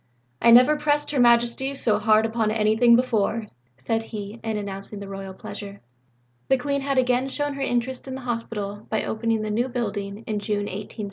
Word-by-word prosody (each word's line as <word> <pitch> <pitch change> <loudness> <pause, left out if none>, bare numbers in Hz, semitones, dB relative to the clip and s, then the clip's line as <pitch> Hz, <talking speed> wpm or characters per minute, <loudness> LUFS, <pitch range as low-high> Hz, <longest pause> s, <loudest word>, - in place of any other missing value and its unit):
"I 235 - +5
never 250 +6 +7
pressed 295 -1 0
Her 285 - 0
Majesty 240 +3 +3
so 215 -6 +1
hard 215 0 +4
upon 225 -1 0
anything 220 +2 +4
before," 230 -2 +1 0.3
said 225 - -1
he, 215 0 -7
in 220 -1 -2
announcing 200 0 -6
the 200 - -7
Royal 195 -1 -7
pleasure. 200 -1 -8 0.7
The 265 - +4
Queen 280 +2 -1
had 275 0 -1
again 255 +1 +2
shown 290 +1 -2
her 275 - -6
interest 255 0 -2
in 260 - -5
the 265 - -7
Hospital 220 -4 -4
by 220 - 0
opening 225 0 -1
the 215 - -2
new 240 +5 0
building 205 -3 -4
in 215 -1 -2
June 205 0 -1
1871. 205 +3 -7
230 Hz, 190 wpm, -24 LUFS, 210-255 Hz, 0.7 s, never